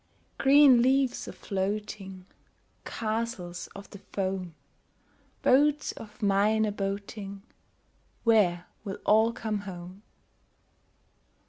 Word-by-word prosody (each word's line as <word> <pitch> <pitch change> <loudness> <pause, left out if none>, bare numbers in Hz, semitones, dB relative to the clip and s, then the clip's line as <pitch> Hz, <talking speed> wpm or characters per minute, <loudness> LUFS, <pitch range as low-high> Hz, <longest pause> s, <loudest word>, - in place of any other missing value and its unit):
Green 275 -3 +7
leaves 260 0 +2
a - - -5
floating, 195 -1 -4 0.6
Castles 215 -6 -3
of 200 0 -9
the 200 - -10
foam, 185 -4 -4 0.9
Boats 295 +3 +3
of 215 0 -11
mine 205 +2 +3
a 210 - -1
boating— 200 0 -5 0.8
Where 185 -7 +3 0.2
will 200 -2 -5
all 220 +2 +5
come 220 -2 -3
home? 185 -1 -9
205 Hz, 95 wpm, -28 LUFS, 195-230 Hz, 0.9 s, Green